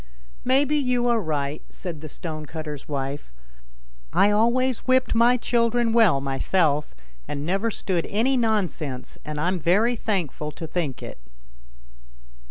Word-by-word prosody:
"Maybe 275 +3 +3
you 250 -3 +1
are 235 -1 +3
right," 150 -3 -2
said 170 -5 -7
the 155 - -7
stonecutter's 155 -2 -6
wife. 140 - -4 0.4
" - - -29
I 205 - +5
always 240 +4 +2
whipped 255 0 +3
my 235 +2 +5
children 235 -1 +1
well 220 -11 +5
myself, 145 - 0 0.3
and 145 0 -4
never 195 +6 0
stood 185 -5 -2
any 235 +6 +2
nonsense, 185 - -1
and 150 -1 -5
I'm 180 +4 0
very 205 +9 +3
thankful 175 - -2
to 165 - -7
think 155 -5 -3
it." - - -8
180 Hz, 135 wpm, -24 LUFS, 150-235 Hz, 0.4 s, I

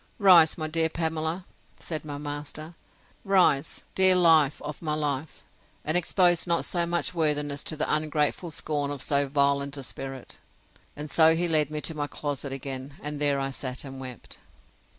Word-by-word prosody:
Rise, 180 -6 +6
my 155 -1 -3
dear 160 +1 0
Pamela, 160 +2 -3 0.3
said 155 -3 -4
my 145 -2 -6
master; 145 +2 -6 0.5
rise, 180 -7 +2
dear 190 -1 +6
life 160 -5 +4
of 150 - -7
my 155 -2 -2
life; 145 -1 -3 0.4
and 155 - 0
expose 175 0 +3
not 170 -1 +1
so 170 -1 -1
much 175 +1 0
worthiness 145 -3 0
to 155 - -2
the 155 - -1
ungrateful 155 +2 -1
scorn 145 -2 -3
of 145 -1 -5
so 140 -1 +1
violent 140 0 +1
a 135 - -6
spirit. 135 0 -9 0.6
And 150 +1 -6
so 160 +2 +5
he 175 +1 +1
led 155 -3 +2
me 155 0 -4
to 160 - -1
my 145 -1 -3
closet 145 -2 -5
again, 135 0 -6
and 150 0 -4
there 145 -1 +2
I 135 0 -2
sat 130 -1 -4
and 135 -1 -9
wept. 130 -3 -9
150 Hz, 170 wpm, -26 LUFS, 140-165 Hz, 0.6 s, Rise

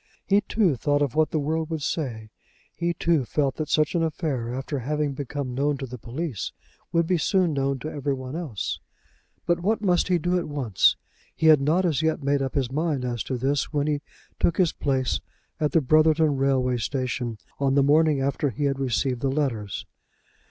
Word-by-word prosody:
He 200 +1 +4
too 200 -11 +1
thought 145 +3 +1
of 140 -4 -1
what 155 0 +3
the - - -1
world 155 +2 -1
would 160 -3 -3
say, 115 -10 -3 0.4
he 170 0 -1
too 165 -4 +2
felt 135 +2 -1
that 155 -2 -3
such 155 -1 +2
an 170 - +1
affair, 150 -7 -2
after 135 +3 -3
having 150 +2 -1
become 140 -1 -4
known 140 +2 0
to 135 - -5
the 125 -1 -8
police, 125 - -4 0.4
would 170 -1 +2
be 175 0 +1
soon 180 0 +2
known 135 -1 0
to 150 - -6
every 140 -1 -1
one 130 +2 -7
else. 150 - -3 0.7
But 175 0 +2
what 210 +5 0
must 180 -3 +3
he 180 -1 +3
do 175 +2 +1
at 170 - -4
once? 135 -9 +2 0.4
He - - -2
had 155 -3 +7
not 165 +7 +2
as 155 -5 +1
yet 160 -2 0
made 140 0 +2
up 135 -1 -3
his 130 -3 0
mind 150 -3 -1
as 120 -2 -2
to 130 - -2
this 135 +3 0
when 145 -2 0
he 150 -1 0 0.4
took 170 - +2
his 180 -4 +3
place 130 - 0 0.4
at 150 -1 +1
the 165 - +4
Brotherton 155 +1 +4
Railway 130 -2 +1
Station 120 -1 -2 0.2
on 135 -1 +2
the 140 - +5
morning 150 0 +4
after 140 +1 0
he 145 +3 -4
had 135 -1 0
received 130 -1 0
the 135 - +1
letters. 130 -8 -2
145 Hz, 200 wpm, -25 LUFS, 130-160 Hz, 0.7 s, had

